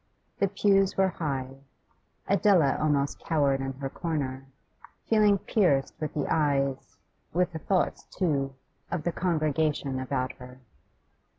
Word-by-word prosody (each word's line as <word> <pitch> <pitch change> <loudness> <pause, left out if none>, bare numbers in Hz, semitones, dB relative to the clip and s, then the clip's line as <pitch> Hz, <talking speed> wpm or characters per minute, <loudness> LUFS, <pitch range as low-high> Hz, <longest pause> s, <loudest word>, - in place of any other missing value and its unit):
The 200 - +3
pews 195 0 +2
were 190 0 +4
high; 135 -6 -4 0.7
Adela 190 -8 +4
almost 145 -2 +1
cowered 140 -4 +1
in 135 0 -3
her 135 +1 -5
corner, 135 -6 -3 0.6
feeling 210 -2 +4
pierced 175 -10 +1
with 155 -1 -4
the 145 - 0
eyes, 140 -3 0 0.4
with 180 +1 +1
the 160 - -4
thoughts 185 +4 0
too, 140 -7 -1 0.3
of 170 -3 -3
the 175 - 0
congregation 155 -5 0
about 130 -1 -2
her. 125 0 -12
150 Hz, 125 wpm, -28 LUFS, 135-180 Hz, 0.7 s, were